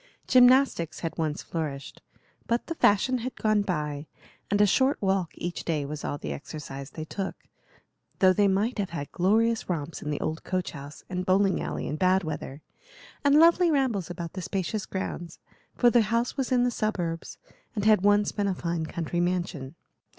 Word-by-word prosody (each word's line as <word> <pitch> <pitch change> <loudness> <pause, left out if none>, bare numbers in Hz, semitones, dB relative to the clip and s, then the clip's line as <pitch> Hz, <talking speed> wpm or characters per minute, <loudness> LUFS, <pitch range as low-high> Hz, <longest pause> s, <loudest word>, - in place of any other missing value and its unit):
Gymnastics 255 - +4
had 165 - -3
once 155 -2 -1
flourished, 145 -4 -5 0.5
but 235 +1 0
the 330 - -3
fashion 255 -2 +3
had 250 +2 -5
gone 215 -1 +2
by, 150 -6 -3 0.4
and 205 - +1
a 210 - +7
short 260 +8 +2
walk 190 -3 +1
each 175 0 -4
day 155 -4 -1
was 150 +1 -6
all 145 - -2
the 75 - -5
exercise 135 - -8
they 155 +1 -7
took, 190 +4 -4 0.8
though 185 -1 +5
they 205 +2 +3
might 205 +5 0
have 195 - -1
had 145 -4 -6
glorious 225 +5 +2
romps 165 -2 -3
in 150 - -5
the 150 - -2
old 160 +1 -3
coach 185 -2 -2
house 145 0 -10
and 180 -1 -3
bowling 190 +1 +2
alley - - -4
in 150 - -3
bad 185 +2 +3
weather, 150 -2 -6 0.6
and 285 0 +5
lovely 340 +2 +6
rambles 255 - 0
about 170 -1 -6
the 185 - -5
spacious 190 +3 -3
grounds; 175 -3 -5 0.4
for 240 -1 +4
the 240 - +5
house 230 +3 0
was 265 -2 -2
in 250 -1 +4
the 245 - +2
suburbs, 175 -8 -3 0.4
and 205 -1 -2
had 215 -3 +5
once 205 +1 +3
been 205 -1 -1
a 190 - 0
fine 170 -2 -2
country 170 +1 -3
mansion. 175 -5 -2
185 Hz, 185 wpm, -27 LUFS, 160-215 Hz, 0.8 s, a